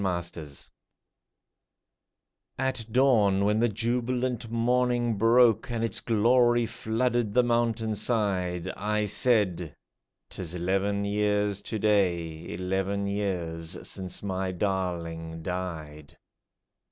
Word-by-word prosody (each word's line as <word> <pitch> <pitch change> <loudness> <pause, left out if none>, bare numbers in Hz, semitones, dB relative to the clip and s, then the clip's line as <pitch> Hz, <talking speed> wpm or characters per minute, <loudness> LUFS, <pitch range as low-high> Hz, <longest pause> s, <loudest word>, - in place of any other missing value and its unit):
AT 90 -2 +1
DAWN 85 - -4 2.3
At 130 -3 -1
dawn, 110 -7 +4
when 105 +1 +2
the 120 +1 +3
jubilant 120 +2 -1
morning 120 0 +1
broke, 115 +1 +4
And 115 -1 -2
its 115 - -1
glory 120 +1 +3
flooded 115 0 -1
the 125 - +5
mountain 115 -2 +1
side, 95 -5 -1
I 105 +2 -1
said, 105 -4 +2
^' 80 -4 -7 0.6
'Tis 90 -2 -5
eleven 100 +3 0
years 105 -1 0
to 110 - -4
day, 85 -6 0
Eleven 95 +3 -1
years 90 -5 -3
since 95 0 -6
my 95 -1 -2
darling 85 -4 -3
died 80 -5 -6
105 Hz, 105 wpm, -27 LUFS, 90-115 Hz, 2.3 s, the